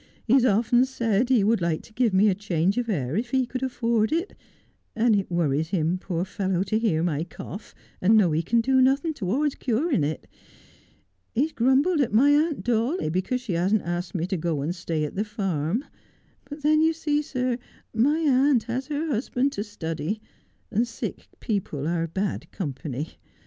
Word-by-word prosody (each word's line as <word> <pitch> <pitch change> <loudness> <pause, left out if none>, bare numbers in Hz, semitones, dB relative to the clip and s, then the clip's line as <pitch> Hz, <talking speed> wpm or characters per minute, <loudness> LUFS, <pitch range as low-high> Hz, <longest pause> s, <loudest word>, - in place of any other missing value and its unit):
He 235 - +2
has 260 -2 +5
often 240 +2 +4
said 235 -2 0
he 245 -6 +4
would 220 -1 +2
like 170 -2 -1
to 220 - -17
give 240 -1 +2
me 190 +3 +4
a 200 - +4
change 190 +1 0
of 235 -1 -3
air 145 - -1
if 235 +4 -1
he 260 0 +2
could 255 +1 -5
afford 235 -3 0
it, 340 +5 -1 0.6
and 230 -1 +3
it 195 -1 -1
worries 160 -3 0
him, 175 -1 0
poor 180 -1 -2
fellow, 190 -2 -1
to 215 +2 0
hear 175 -9 +1
my 160 -3 0
cough, 185 +4 -9 0.3
and 195 +4 +4
to - - +7
know 190 -6 +4
he 155 +2 +1
can 230 +8 +2
do 260 +2 +3
nothing 275 +5 +2
towards 270 +6 0
curing 255 - 0
it. 155 +2 -3 1.1
He 250 - +3
has 315 - -2
grumbled 275 +7 +3
at 260 - 0
my 260 +7 +5
aunt 305 +1 +2
Dawley 240 - 0
because 190 +9 -1
she 230 -7 -4
hasn't 185 +5 +1
asked 175 +3 -4
me 170 -2 0
to 190 +1 -2
go 160 -3 -1
and 155 +5 -1
stay 165 -3 -3
at 150 - -3
the 205 - -1
farm; 200 - -2 0.6
but 290 0 -9
then 305 +1 +4
you 320 +1 +4
see, 300 -2 0
sir, 255 -4 -2 0.3
my 285 +8 +2
aunt 275 -4 +3
has 255 +3 -3
her 300 +1 -2
husband 270 0 0
to 205 - -3
study, 170 -2 -4 0.5
and 230 +4 +1
sick 230 - -6
people 180 - -2
are 165 0 0
bad 190 +5 -3
company. 145 -2 -5
220 Hz, 195 wpm, -25 LUFS, 175-260 Hz, 1.1 s, to